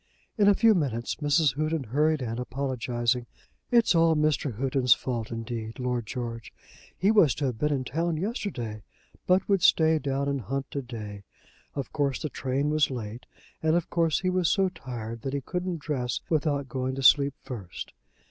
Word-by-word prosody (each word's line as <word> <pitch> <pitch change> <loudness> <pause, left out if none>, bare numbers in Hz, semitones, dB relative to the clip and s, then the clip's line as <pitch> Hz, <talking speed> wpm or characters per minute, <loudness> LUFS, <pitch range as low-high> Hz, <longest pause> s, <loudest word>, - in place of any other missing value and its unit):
In 205 -3 +3
a 205 - +6
few 225 +1 +5
minutes 125 - -1
Mrs. 145 -2 +2
Houghton 155 -1 0
hurried 150 +4 +1
in, 115 0 -3
apologising. 125 -2 -1 0.4
"It's 235 -4 +4
all 165 -1 +4
Mr. 150 -5 +1
Houghton's 130 -1 +3
fault 120 -4 -4
indeed, 115 -1 -5
Lord 125 -3 -2
George. 115 -3 -5 0.5
He 195 +3 +3
was 180 - +5
to 145 - -2
have 125 -4 -2
been 150 +2 +1
in 135 -3 0
town 165 +5 -1
yesterday, 155 - -3 0.5
but 185 +1 +3
would 195 -3 +2
stay 160 -1 +5
down 140 -1 -1
and 140 -1 -1
hunt 135 +6 -4
to 140 - -2
day. 105 -5 -8 0.5
Of 140 -2 -4
course 140 -3 0
the 155 - -3
train 140 +3 -1
was 155 -1 +3
late, 120 -2 -6 0.3
and 160 +1 +2
of 175 - -1
course 165 -1 +2
he 185 -1 +1
was 180 -2 +2
so 195 -1 +3
tired 115 -9 -7
that 135 - -4
he 140 - -1
couldn't 180 +4 -3
dress 135 -5 -2
without 145 -3 0
going 130 0 -2
to 135 - -4
sleep 140 +1 +6
first." 110 -10 -7
140 Hz, 180 wpm, -27 LUFS, 125-160 Hz, 0.5 s, a